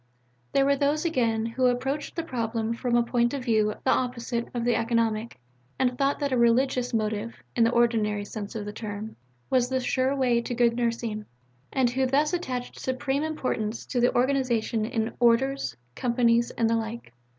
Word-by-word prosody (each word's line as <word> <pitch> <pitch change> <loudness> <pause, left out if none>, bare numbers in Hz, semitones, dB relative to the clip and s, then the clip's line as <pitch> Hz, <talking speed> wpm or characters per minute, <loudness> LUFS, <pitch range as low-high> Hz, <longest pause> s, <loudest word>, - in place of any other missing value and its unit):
There 275 - +3
were 280 0 +4
those, 290 +4 +1
again, 230 -8 +1
who 250 +3 +1
approached 270 +4 -1
the 335 - -2
problem 230 -5 -2
from 240 +1 -1
a 240 - +4
point 240 +2 +1
of 260 -3 -5
view 215 -3 +2
the 260 - +3
opposite 235 -1 -1
of 240 -1 -3
the 240 -1 +3
economic, 230 -1 0 0.4
and 250 -1 +1
thought 275 +2 +1
that 285 -1 0
a 255 - +2
"religious" 245 +1 +2
motive 220 0 -1 0.2
(in 230 - +4
the - - +4
ordinary 220 -4 +2
sense 205 0 -7
of 210 -2 -4
the 210 - -6
term) 215 0 -6 0.4
was 250 -2 +3
the 260 0 +1
sure 260 +1 +1
way 245 -3 +2
to 240 +1 -4
good 235 -1 +3
nursing, 230 -3 -2 0.4
and 255 -3 +2
who 260 +1 +1
thus 290 +5 +2
attached 255 -8 -3
supreme 265 +2 -1
importance 255 -8 -2
to 245 -1 +1
organization 245 -4 +1
in 225 0 -2
"Orders," 255 +3 +2 0.2
"Companies," 235 - +2
and 230 - 0
the 230 0 +2
like. 225 - -5
240 Hz, 180 wpm, -26 LUFS, 230-260 Hz, 0.4 s, were